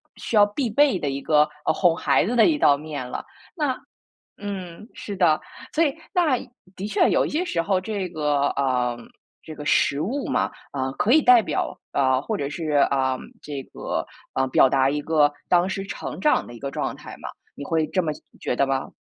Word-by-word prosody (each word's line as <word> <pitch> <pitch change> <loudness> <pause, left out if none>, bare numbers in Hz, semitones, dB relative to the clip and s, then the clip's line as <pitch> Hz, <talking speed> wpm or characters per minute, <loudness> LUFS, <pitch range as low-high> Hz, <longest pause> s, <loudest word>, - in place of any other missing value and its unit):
需 - - -4
要 205 -1 +7
必 225 +5 -2
备 270 -3 +3
的 145 - -1
一 135 0 -3
个， 150 -1 +4 0.2
呃， 155 - +3
哄 165 0 +2
孩 - - +3
子 230 +7 -1
的 230 - +6
一 320 - +4
道 145 - +4
面 145 -3 -6
了。 - - -5 0.3
那 295 -6 0 0.6
嗯， 195 -1 -7
是 205 - -6
的。 175 -5 +3 0.4
所 330 - +4
以 285 -3 0 0.2
那 320 -8 +3 0.4
的 195 - -5
确 210 - +3
有 - - +3
一 - - -3
些 325 +5 -1
时 170 - -1
候 185 +3 +1
这 195 -1 -3
个 150 -4 0
嗯， 125 -3 +1 0.5
这 155 - -9
个 150 0 -8
食 140 -1 +2
物 255 - -2
嘛， - - 0 0.2
啊， 130 -1 -2
可 210 - +1
以 315 - +7
代 250 -4 +6
表 - - -2
呃， 130 -2 +3
或 220 - -3
者 140 -9 -2
是 155 -1 -2
呃， 130 -1 +1 0.2
这 145 -2 -5
个 - - -3 0.3
呃， 130 - +1
表 130 0 +5
达 135 0 +3
一 145 +1 -1
个 150 -1 +3 0.2
当 180 +1 +4
时 195 0 -3
成 195 - -6
长 300 - +2
的 120 - -10
一 - - -10
个 140 +3 -4
状 - - -3
态 - - -10
嘛。 - - -7 0.3
你 - - -6
会 160 +1 0
这 185 - 0
么 160 - -1 0.3
觉 - - -1
得 140 - +3
吗？ 135 0 -1
165 Hz, 225 characters per minute, -24 LUFS, 140-210 Hz, 0.6 s, 要